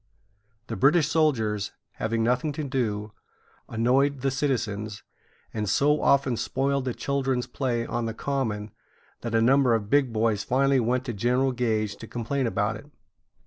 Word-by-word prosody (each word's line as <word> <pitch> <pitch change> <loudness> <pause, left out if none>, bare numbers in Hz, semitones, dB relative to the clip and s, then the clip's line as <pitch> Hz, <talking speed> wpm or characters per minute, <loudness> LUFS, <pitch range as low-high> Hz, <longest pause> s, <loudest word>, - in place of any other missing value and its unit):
The 115 - -5
British 145 - +4
soldiers, 115 -11 +1 0.2
having 115 0 -1
nothing 125 +6 +1
to 155 - -4
do, 110 -6 -2 0.6
annoyed 130 +4 +2
the 135 0 +1
citizens, 110 -6 -2 0.5
and 105 -3 -2
so 150 +8 +3
often 135 -3 +3
spoiled 135 +2 -1
the 125 - -1
children's 135 -3 -1
play 120 -2 -2
on 120 -1 -2
the 115 - -4
Common, 110 -7 -2 0.5
that 115 -1 -3
a 115 - +4
number 130 -1 +4
of 105 -2 -4
big 140 -4 +3
boys 110 -2 +1
finally 135 +3 +2
went 125 +2 0
to 120 - -3
General 125 +5 +1
Gage 110 -4 -1
to 115 - -10
complain 120 +3 -2
about 105 0 -1
it. 125 - -14
125 Hz, 155 wpm, -26 LUFS, 110-135 Hz, 0.6 s, British